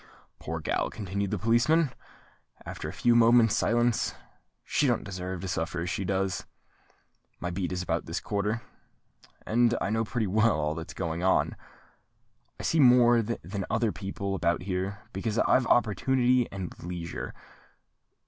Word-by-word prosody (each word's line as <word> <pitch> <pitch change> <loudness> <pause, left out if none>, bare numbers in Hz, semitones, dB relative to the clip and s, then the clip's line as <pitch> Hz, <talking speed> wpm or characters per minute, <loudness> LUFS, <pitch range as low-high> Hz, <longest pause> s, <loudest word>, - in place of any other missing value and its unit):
"Poor 80 +1 -4
gal!" 75 - -1
continued 100 0 -3
the - - -1
policeman, 130 +7 +3 0.7
after 75 - -6
a - - -5
few 120 +5 +2
moments' 115 -1 +5
silence; 120 -1 +1 0.5
"she 145 - +1
don't 120 -3 +1
deserve 95 -2 -5
to 95 - -4
suffer 85 -1 -2
as 90 +2 -2
she 100 - -2
does. 95 0 -1 0.9
My 90 - -3
beat 90 0 -3
is 90 0 -2
about 85 -1 -2
this 80 - -2
quarter: 105 +3 -2 0.8
and 120 +1 +3
I 100 - -1
know 110 +1 +1
pretty 115 0 -2
well 105 -2 +2
all 75 0 0
that's 80 0 -7
going 80 +1 -3
on. 95 +1 +2 1.0
I - - -6
see 165 - +1
more 120 -3 +6
than 100 -3 -4
other 115 -1 +1
people 100 -1 -4
about 85 -2 0
here, 95 +2 -3
because 105 +3 -2
I've 125 +1 +3
opportunity 125 +3 +2
and 95 -3 -5
leisure. 85 -1 -5
100 Hz, 150 wpm, -28 LUFS, 90-120 Hz, 1.0 s, more